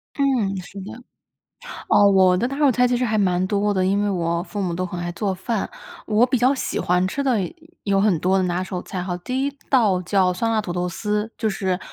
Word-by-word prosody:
嗯， 255 Hz, -9 st, +1 dB
是 195 Hz, +2 st, -11 dB
的。 190 Hz, -, -8 dB, 1.0 s
哦， 205 Hz, -1 st, +6 dB
我 190 Hz, -2 st, +5 dB
的 240 Hz, -, 0 dB
拿 275 Hz, +2 st, -5 dB
手 290 Hz, -3 st, +4 dB
菜 250 Hz, +1 st, +3 dB
其 245 Hz, -, +1 dB
实 250 Hz, -, 0 dB
还 220 Hz, -1 st, 0 dB
蛮 185 Hz, -2 st, +2 dB
多 205 Hz, +1 st, 0 dB
的， 185 Hz, -1 st, +1 dB
因 200 Hz, +2 st, +1 dB
为 205 Hz, -, 0 dB
我 170 Hz, -3 st, -1 dB
父 205 Hz, +2 st, -5 dB
母 180 Hz, -3 st, -1 dB
都 185 Hz, +2 st, -2 dB
很 180 Hz, 0 st, -6 dB
爱 175 Hz, 0 st, -3 dB
做 195 Hz, +2 st, -2 dB
饭。 195 Hz, +3 st, -3 dB, 0.4 s
我 220 Hz, +2 st, +4 dB
比 255 Hz, 0 st, 0 dB
较 255 Hz, +4 st, +3 dB
喜 -, -, -3 dB
欢 180 Hz, +1 st, +1 dB
吃 280 Hz, +9 st, -3 dB
的 255 Hz, -5 st, +2 dB
有 180 Hz, -, -4 dB, 0.3 s
有 195 Hz, -1 st, +2 dB
很 200 Hz, -4 st, +3 dB
多 185 Hz, +3 st, +2 dB
的 190 Hz, -, +1 dB
拿 180 Hz, +1 st, -1 dB
手 185 Hz, -1 st, -5 dB
菜 185 Hz, -1 st, -5 dB
哈， 180 Hz, -1 st, -3 dB
第 255 Hz, +9 st, -2 dB
一 285 Hz, -, -1 dB, 0.2 s
道 210 Hz, -9 st, +3 dB
叫 185 Hz, 0 st, +2 dB
酸 225 Hz, +5 st, -1 dB
辣 220 Hz, -1 st, +1 dB
土 180 Hz, -4 st, -5 dB
豆 180 Hz, 0 st, -1 dB
丝， 210 Hz, +3 st, -2 dB
就 220 Hz, -, 0 dB
是 190 Hz, -2 st, -1 dB
195 Hz, 260 characters per minute, -22 LUFS, 180-225 Hz, 1.0 s, 哦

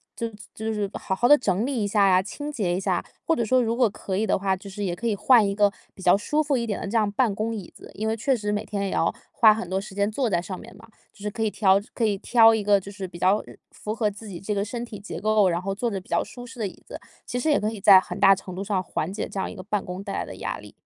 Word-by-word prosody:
就 230 Hz, -, -3 dB, 0.3 s
就 220 Hz, 0 st, -3 dB
是 205 Hz, -2 st, -2 dB
好 190 Hz, -, -3 dB
好 240 Hz, +6 st, +2 dB
地 295 Hz, +3 st, +8 dB
整 205 Hz, -4 st, 0 dB
理 250 Hz, -4 st, -1 dB
一 205 Hz, -, 0 dB
下 205 Hz, 0 st, +2 dB
啊， 185 Hz, -1 st, +4 dB
清 290 Hz, +8 st, -6 dB
洁 195 Hz, -10 st, -1 dB
一 185 Hz, -, -1 dB
下。 -, -, -1 dB, 0.2 s
或 330 Hz, -, +2 dB
者 235 Hz, -, 0 dB
说 255 Hz, +3 st, +3 dB
如 230 Hz, 0 st, 0 dB
果 245 Hz, -3 st, +4 dB
可 190 Hz, -1 st, -4 dB
以 215 Hz, -, +1 dB
的 -, -, +2 dB
话， 195 Hz, -1 st, +1 dB
就 195 Hz, +2 st, -12 dB
是 200 Hz, +1 st, -6 dB
也 175 Hz, -2 st, -1 dB
可 220 Hz, -, -8 dB
以 225 Hz, -3 st, +1 dB
换 225 Hz, 0 st, +5 dB
一 200 Hz, -, -1 dB
个 205 Hz, 0 st, +3 dB, 0.2 s
比 -, -, -14 dB
较 180 Hz, +1 st, +5 dB
舒 300 Hz, +9 st, 0 dB
服 290 Hz, -3 st, +1 dB
一 235 Hz, -, -1 dB
点 210 Hz, -3 st, -3 dB
的 -, -, -4 dB
这 225 Hz, +3 st, 0 dB
样 210 Hz, -2 st, +2 dB
办 220 Hz, -1 st, +1 dB
公 220 Hz, +2 st, -2 dB
椅 200 Hz, -5 st, -8 dB
子， -, -, -13 dB
因 220 Hz, +2 st, -3 dB
为 225 Hz, -, 0 dB
确 265 Hz, +4 st, +1 dB
实 210 Hz, -2 st, -2 dB
每 210 Hz, +1 st, -2 dB
天 200 Hz, -2 st, -3 dB
也 -, -, -2 dB
要 -, -, +1 dB, 0.2 s
花 220 Hz, -2 st, +6 dB
很 210 Hz, -5 st, -5 dB
多 190 Hz, -, 0 dB
时 195 Hz, 0 st, -9 dB
间 205 Hz, +1 st, +1 dB
坐 250 Hz, +1 st, 0 dB
在 175 Hz, -4 st, +1 dB
上 185 Hz, +1 st, -6 dB
面 235 Hz, -, -12 dB
嘛， -, -, -15 dB, 0.2 s
就 -, -, -24 dB
是 210 Hz, -, -2 dB
可 225 Hz, -, -6 dB
以 220 Hz, -, +2 dB
挑 195 Hz, -2 st, +3 dB, 0.2 s
可 235 Hz, -, -1 dB
以 210 Hz, -2 st, +1 dB
挑 225 Hz, -2 st, +6 dB
一 220 Hz, -2 st, 0 dB
个 205 Hz, 0 st, +4 dB
就 195 Hz, +1 st, -10 dB
是 195 Hz, -2 st, -6 dB
比 175 Hz, -, -11 dB
较， 190 Hz, +4 st, +3 dB
呃， -, -, -11 dB, 0.2 s
符 215 Hz, +1 st, -5 dB
合 215 Hz, -3 st, 0 dB
自 210 Hz, +2 st, -11 dB
己 180 Hz, -4 st, -7 dB
这 210 Hz, +2 st, -2 dB
个 200 Hz, -1 st, 0 dB
身 235 Hz, +3 st, -5 dB
体 210 Hz, -4 st, -9 dB
结 175 Hz, -5 st, -7 dB
构， 215 Hz, -3 st, +3 dB
然 170 Hz, 0 st, 0 dB
后 195 Hz, +1 st, -3 dB
坐 235 Hz, +4 st, -1 dB
着 195 Hz, -3 st, -3 dB
比 185 Hz, -, -18 dB
较 -, -, +2 dB
舒 245 Hz, -1 st, -10 dB
适 250 Hz, -1 st, -12 dB
的 210 Hz, -, 0 dB
椅 185 Hz, -, -13 dB
子， -, -, -9 dB, 0.3 s
其 245 Hz, -, -3 dB
实 310 Hz, -, 0 dB
也 295 Hz, -, +4 dB
可 215 Hz, +1 st, -1 dB
以 220 Hz, -, -7 dB
在 195 Hz, -2 st, +9 dB
很 -, -, -6 dB
大 195 Hz, -1 st, +7 dB
程 185 Hz, -1 st, -9 dB
度 190 Hz, -, -4 dB
上 195 Hz, -2 st, -1 dB
缓 170 Hz, +1 st, -3 dB
解 200 Hz, -, -4 dB
这 195 Hz, -, -6 dB
样 -, -, -2 dB
一 -, -, -9 dB
个 185 Hz, -, -8 dB
办 205 Hz, +1 st, -2 dB
公 180 Hz, +2 st, -6 dB
带 200 Hz, -, -5 dB
来 -, -, -2 dB
的 -, -, -9 dB
压 -, -, -4 dB
力。 -, -, -13 dB
205 Hz, 355 characters per minute, -25 LUFS, 195-225 Hz, 0.3 s, 在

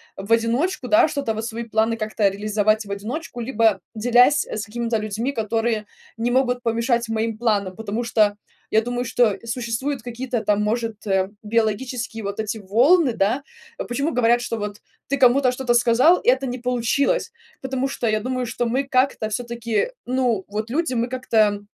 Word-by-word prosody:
в 195 Hz, +3 st, -8 dB
одиночку, 245 Hz, +7 st, +1 dB
да, 320 Hz, +1 st, +5 dB
что-то, 280 Hz, -7 st, -2 dB
вот, 220 Hz, +1 st, -4 dB
свои 230 Hz, +1 st, -4 dB
планы 225 Hz, 0 st, +1 dB
как-то 215 Hz, -2 st, +1 dB
реализовать 210 Hz, +2 st, 0 dB
в 200 Hz, -, -8 dB
одиночку, 240 Hz, +7 st, -5 dB
либо 225 Hz, -5 st, +2 dB
делясь, 245 Hz, +6 st, +4 dB
э, -, -, -5 dB
с 215 Hz, -, -3 dB
какими-то 230 Hz, +1 st, -3 dB
людьми, 215 Hz, +5 st, -2 dB
которые 225 Hz, -1 st, -1 dB, 0.3 s
не 235 Hz, +1 st, -1 dB
могут 250 Hz, -1 st, +1 dB
помешать 235 Hz, 0 st, 0 dB
моим 225 Hz, 0 st, -1 dB
планам. 205 Hz, -5 st, 0 dB
Потому 220 Hz, +2 st, -4 dB
что, 210 Hz, -2 st, +2 dB, 0.3 s
я 220 Hz, -, +3 dB
думаю, 245 Hz, +1 st, -3 dB
что 230 Hz, -4 st, +2 dB
существуют 240 Hz, +3 st, -3 dB
какие-то, 245 Hz, 0 st, -3 dB
там, 210 Hz, 0 st, +2 dB
может, 225 Hz, 0 st, -2 dB
а, 190 Hz, -2 st, +1 dB
биологические, 225 Hz, +1 st, -1 dB
вот, 200 Hz, +1 st, -4 dB
эти 220 Hz, 0 st, -2 dB
волны, 250 Hz, -, +4 dB
да? 225 Hz, +6 st, 0 dB, 0.5 s
Почему 280 Hz, +6 st, -1 dB
говорят, 240 Hz, 0 st, +3 dB
что, 235 Hz, -, -3 dB
вот, 205 Hz, -1 st, -5 dB, 0.3 s
ты 280 Hz, -, +1 dB
кому-то 255 Hz, 0 st, +4 dB
что-то 250 Hz, -1 st, 0 dB
сказал 240 Hz, +8 st, +5 dB
и -, -, +2 dB
это 260 Hz, +1 st, +2 dB
не 250 Hz, 0 st, -4 dB
получилось? 250 Hz, -, 0 dB, 0.3 s
Потому 265 Hz, 0 st, -2 dB
что, 245 Hz, -, -2 dB
я 215 Hz, -1 st, +1 dB
думаю, 255 Hz, +1 st, -2 dB
что 240 Hz, +1 st, -2 dB
мы 260 Hz, +4 st, 0 dB
как-то, 255 Hz, -4 st, +1 dB
всё-таки, 235 Hz, -, -2 dB
ну, 245 Hz, -5 st, 0 dB
вот, 215 Hz, +2 st, -4 dB
люди, 305 Hz, +2 st, -1 dB
мы 240 Hz, 0 st, 0 dB
как-то 220 Hz, -5 st, +1 dB
230 Hz, 175 wpm, -22 LUFS, 215-255 Hz, 0.5 s, да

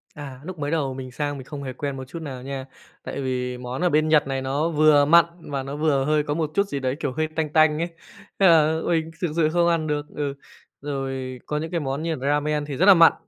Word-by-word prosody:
À, 140 Hz, -4 st, -8 dB
lúc 180 Hz, 0 st, -8 dB
mới 145 Hz, +1 st, -2 dB
đầu 140 Hz, -5 st, 0 dB
mình 130 Hz, -1 st, -7 dB
sang 145 Hz, +2 st, -3 dB
mình 130 Hz, -, -9 dB
không 140 Hz, -1 st, -7 dB
hề 130 Hz, -, -5 dB
quen 140 Hz, +1 st, -4 dB
một 130 Hz, -, -6 dB
chút 165 Hz, +4 st, -7 dB
nào 130 Hz, -5 st, -7 dB
nha. 135 Hz, -1 st, -5 dB, 0.4 s
Tại 140 Hz, -, -5 dB
vì 125 Hz, -1 st, -2 dB
món 125 Hz, +5 st, -5 dB
ở 180 Hz, -, +3 dB
bên 155 Hz, 0 st, +2 dB
Nhật 155 Hz, -3 st, +4 dB
này 135 Hz, -1 st, -2 dB
nó 140 Hz, +5 st, 0 dB
vừa 150 Hz, -2 st, +5 dB
mặn 170 Hz, +2 st, +7 dB
mà 140 Hz, -4 st, -4 dB
nó 140 Hz, +1 st, -6 dB
vừa 145 Hz, -3 st, +1 dB
hơi 150 Hz, 0 st, +2 dB
có 145 Hz, -, -2 dB
một 155 Hz, -1 st, -2 dB
chút 200 Hz, 0 st, +2 dB
gì 140 Hz, -, -3 dB
đấy, 130 Hz, 0 st, -1 dB
kiểu, 145 Hz, -, -2 dB
hơi 155 Hz, +1 st, 0 dB
tanh 155 Hz, -1 st, -2 dB
tanh 155 Hz, -1 st, +4 dB
ấy. 170 Hz, -, 0 dB, 0.5 s
Thế 195 Hz, -, +6 dB
là 160 Hz, -1 st, +5 dB
mình 165 Hz, -1 st, 0 dB
thực 175 Hz, -4 st, 0 dB
sự 155 Hz, -2 st, +3 dB
không 170 Hz, +1 st, +2 dB
ăn 165 Hz, -2 st, +1 dB
được. 150 Hz, -1 st, -1 dB
Ừ, 145 Hz, -2 st, -2 dB, 0.5 s
rồi 135 Hz, -2 st, -4 dB
có 150 Hz, -, -2 dB
những 160 Hz, +2 st, -4 dB
cái 170 Hz, -, 0 dB
món 140 Hz, 0 st, -3 dB
như 165 Hz, -1 st, -1 dB
là 135 Hz, 0 st, -4 dB
ramen 150 Hz, 0 st, +1 dB
thì 145 Hz, -2 st, -5 dB
rất 185 Hz, -, +3 dB
là 200 Hz, -, +10 dB
mặn. 165 Hz, -2 st, +7 dB
150 Hz, 265 wpm, -24 LUFS, 135-160 Hz, 0.5 s, là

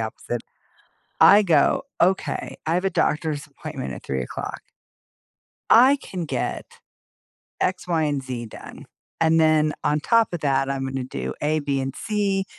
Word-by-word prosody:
opposite- 115 Hz, +1 st, -4 dB, 0.8 s
I 210 Hz, +1 st, +8 dB
go, 160 Hz, -7 st, +3 dB, 0.2 s
"Okay. 185 Hz, +2 st, 0 dB
I 160 Hz, +1 st, 0 dB
have 180 Hz, +2 st, 0 dB
a 195 Hz, -, +2 dB
doctor's 150 Hz, -2 st, 0 dB
appointment 145 Hz, -1 st, -7 dB
at -, -, -10 dB
3:00, 65 Hz, -2 st, -4 dB, 1.1 s
I 260 Hz, +5 st, +7 dB
can 180 Hz, -9 st, -6 dB
get -, -, -3 dB, 1.0 s
X, 185 Hz, 0 st, -1 dB
Y, 165 Hz, -3 st, +1 dB
and 145 Hz, -2 st, -1 dB
Z 125 Hz, -3 st, -5 dB
done, -, -, -11 dB, 0.3 s
and 165 Hz, 0 st, +4 dB
then 155 Hz, -1 st, +3 dB
on 150 Hz, +1 st, +1 dB
top 230 Hz, +4 st, +2 dB
of 170 Hz, -, -3 dB
that, 135 Hz, -1 st, +1 dB
I'm 135 Hz, -1 st, -2 dB
gonna 130 Hz, -1 st, -3 dB
do 65 Hz, -, -5 dB
A, 155 Hz, +1 st, +1 dB
B, 140 Hz, -1 st, -1 dB
and 135 Hz, 0 st, -4 dB
C, 200 Hz, -3 st, -1 dB
155 Hz, 155 wpm, -23 LUFS, 135-180 Hz, 1.1 s, I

